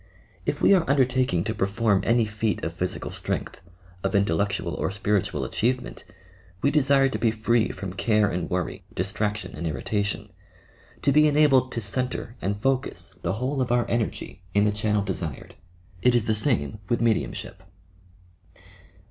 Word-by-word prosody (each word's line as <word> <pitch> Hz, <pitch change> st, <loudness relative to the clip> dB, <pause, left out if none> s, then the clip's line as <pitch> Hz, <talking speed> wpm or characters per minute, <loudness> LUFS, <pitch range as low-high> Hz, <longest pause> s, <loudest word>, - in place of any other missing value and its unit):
If -, -, -1 dB
we -, -, +7 dB
are 185 Hz, -4 st, +4 dB
undertaking 130 Hz, -9 st, +2 dB
to 110 Hz, -, -2 dB
perform 100 Hz, 0 st, +1 dB
any 115 Hz, 0 st, +4 dB
feat 105 Hz, -1 st, -2 dB
of -, -, -2 dB
physical -, -, -3 dB
strength, -, -, -4 dB, 0.4 s
of 95 Hz, +1 st, 0 dB
intellectual 100 Hz, -3 st, +1 dB
or -, -, -1 dB
spiritual 100 Hz, 0 st, -1 dB
achievement, 125 Hz, +3 st, -2 dB, 0.6 s
we 140 Hz, -, +4 dB
desire 140 Hz, -2 st, +4 dB
to 135 Hz, -, -3 dB
be 115 Hz, -, +3 dB
free 110 Hz, +1 st, +1 dB
from 95 Hz, -1 st, -6 dB
care 105 Hz, +1 st, +2 dB
and 90 Hz, -3 st, -2 dB
worry, 90 Hz, -1 st, -2 dB
distraction 105 Hz, +3 st, -2 dB
and 85 Hz, +2 st, -3 dB
irritation 100 Hz, +7 st, -2 dB, 0.3 s
— -, -, -28 dB
to 140 Hz, -, +4 dB
be 150 Hz, +2 st, +6 dB
enabled 145 Hz, -4 st, +4 dB
to 115 Hz, -, -2 dB
centre 120 Hz, +2 st, -3 dB
and 100 Hz, +1 st, -1 dB
focus 130 Hz, +3 st, -1 dB
the -, -, -1 dB
whole 130 Hz, +5 st, -1 dB
of 125 Hz, -1 st, -1 dB
our 120 Hz, -1 st, +2 dB
energy 115 Hz, -5 st, -2 dB
in 100 Hz, 0 st, +4 dB
the 105 Hz, -, +3 dB
channel 105 Hz, -1 st, 0 dB
desired. 80 Hz, -8 st, -5 dB, 0.5 s
It 125 Hz, -1 st, +4 dB
is 120 Hz, -3 st, +2 dB
the 110 Hz, -, +2 dB
same 105 Hz, -, +1 dB
with 120 Hz, -, +2 dB
tcediumship. 110 Hz, -, -1 dB
110 Hz, 160 wpm, -25 LUFS, 100-125 Hz, 0.6 s, we